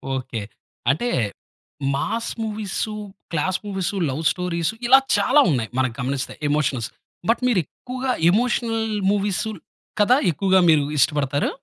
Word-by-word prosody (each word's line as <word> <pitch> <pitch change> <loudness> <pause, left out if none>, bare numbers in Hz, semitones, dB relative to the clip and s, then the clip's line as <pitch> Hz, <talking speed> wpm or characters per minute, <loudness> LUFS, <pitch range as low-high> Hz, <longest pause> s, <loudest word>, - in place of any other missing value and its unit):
Okay. 130 -4 -4 0.5
అంటే 240 +13 -1 0.9
mass 230 +11 -2
movies, 215 -2 -3 0.5
class 175 +3 0
movies, 190 -3 -2 0.2
love 135 +4 -3
stories 175 -1 -1 0.2
ఇలా 265 +2 +8 0.2
చాలా 285 +3 +4
ఉన్నాయి 120 -6 -1
మనకి 130 -3 0
గమనిస్తే 130 +1 -2 0.2
ఎమోషనల్స్. 140 -6 0 0.4
బట్ 230 - +3
మీరు 235 -7 +3
ఎక్కువగా 255 - -4 0.2
ఎమోషనల్ 225 +1 +1 0.3
మూవీస్ 205 -2 0 0.6
కదా! 210 +5 +5 0.2
ఎక్కువగా 190 +5 +3
మీరు 155 -2 +5
ఇష్టపడతారు? 145 0 +2
180 Hz, 120 wpm, -22 LUFS, 140-225 Hz, 0.9 s, ఇలా